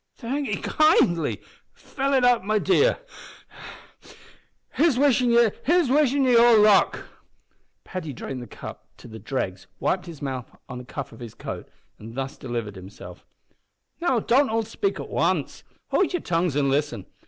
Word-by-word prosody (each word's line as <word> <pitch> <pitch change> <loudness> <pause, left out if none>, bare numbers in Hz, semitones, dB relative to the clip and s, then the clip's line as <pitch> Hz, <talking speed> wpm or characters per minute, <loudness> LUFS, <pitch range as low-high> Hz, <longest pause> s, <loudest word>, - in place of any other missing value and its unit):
"Thank 270 +3 -3
'ee 205 - 0
kindly 195 - +2 0.3
fill 275 0 -3
it 260 -2 +3
up 245 -4 +4
my 215 +2 +1
dear. 430 - +3 1.7
Here's 310 -6 +2
wishin' 260 -3 +3
ye 265 - +3
all 235 -1 +7
luck!" 210 -1 +4 0.8
Paddy 180 -5 -6
drained 130 0 -6
the 120 - -9
cup - - -10
to - - -13
the 110 -1 -10
dregs, 95 -9 -4
wiped 185 -1 -1
his 165 -4 -9
mouth 130 -4 -5 0.2
on 125 - -7
the 125 - -10
cuff 140 +2 -7
of - - -14
his 120 -3 -9
coat, - - -7 0.3
and 115 +2 -10
thus 135 +1 -4
delivered 115 -5 -5
himself 95 +2 -12 0.7
"Now, 265 -9 +2
don't 265 +5 +3
all 225 +1 0
spake 390 - -3
at - - -6
wance. - - -1 0.3
Howld 380 - +2
yer 355 - 0
tongues 170 - -1
an' 145 -1 +2
listen. 145 -8 -1
210 Hz, 155 wpm, -24 LUFS, -, 1.7 s, all